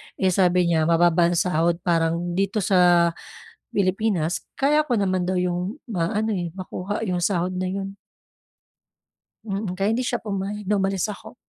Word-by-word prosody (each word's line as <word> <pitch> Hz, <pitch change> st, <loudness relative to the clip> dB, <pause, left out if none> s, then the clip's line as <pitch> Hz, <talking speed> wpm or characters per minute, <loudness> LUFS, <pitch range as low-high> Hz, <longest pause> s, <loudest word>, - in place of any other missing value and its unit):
Eh, 190 Hz, -1 st, +1 dB
sabi 180 Hz, -1 st, +3 dB
niya 165 Hz, -2 st, +2 dB
mababa 170 Hz, 0 st, +4 dB
ang 175 Hz, -, 0 dB
sahod 170 Hz, -1 st, +2 dB
parang 170 Hz, 0 st, 0 dB
dito 195 Hz, +3 st, 0 dB
sa 175 Hz, -2 st, +4 dB, 0.6 s
Pilipinas 185 Hz, -3 st, 0 dB
kaya 300 Hz, +3 st, +2 dB
ko 250 Hz, -5 st, 0 dB
naman 185 Hz, -2 st, 0 dB
daw 185 Hz, -, -1 dB
'yung 180 Hz, +7 st, -2 dB
maano, 215 Hz, +3 st, -1 dB
eh, 175 Hz, -2 st, -4 dB
makuha 185 Hz, +2 st, -5 dB
'yung 180 Hz, -1 st, 0 dB
sahod 185 Hz, -1 st, 0 dB
na 185 Hz, 0 st, -2 dB
'yun. 195 Hz, 0 st, -5 dB, 1.5 s
Mm, 200 Hz, -3 st, -3 dB
kaya 195 Hz, +3 st, 0 dB
hindi 245 Hz, +3 st, -1 dB
siya 240 Hz, -1 st, -2 dB
pumayag 205 Hz, 0 st, -4 dB
na 210 Hz, -, +2 dB
umalis 195 Hz, +1 st, 0 dB
ako. 205 Hz, -, -11 dB
185 Hz, 155 wpm, -23 LUFS, 175-200 Hz, 1.5 s, mababa